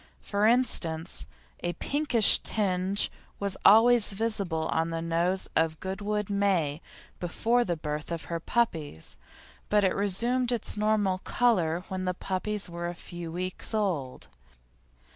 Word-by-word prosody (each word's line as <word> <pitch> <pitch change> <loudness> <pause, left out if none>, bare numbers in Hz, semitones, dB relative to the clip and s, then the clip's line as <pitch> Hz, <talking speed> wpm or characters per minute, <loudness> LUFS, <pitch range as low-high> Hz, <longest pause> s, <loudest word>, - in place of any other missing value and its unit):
For 205 +1 +1
instance, 190 -10 +1 0.3
a 175 - -2
pinkish 260 - +3
tinge 195 -1 +1 0.3
was 200 -1 -1
always 225 +1 +6
visible 195 -7 -1
on 165 +1 0
the 165 0 -3
nose 170 +3 0
of 160 -1 +1
Goodwood 205 +2 -3
Meh 190 -8 +1 0.4
before 230 +7 +1
the 175 -6 -2
birth 150 +1 -5
of 165 -1 -3
her 170 -1 -4
puppies; 160 - -1 0.5
but 210 -1 +3
it 190 - +3
resumed 235 +6 +1
its 235 -3 -2
normal 210 -3 +1
colour 180 -9 +1
when 185 0 -3
the 180 0 -1
puppies 195 +3 -2
were 170 0 -5
a 175 - -5
few 170 -1 -8
weeks 185 +5 -4
old. 170 -12 -2
190 Hz, 135 wpm, -28 LUFS, 170-210 Hz, 0.5 s, always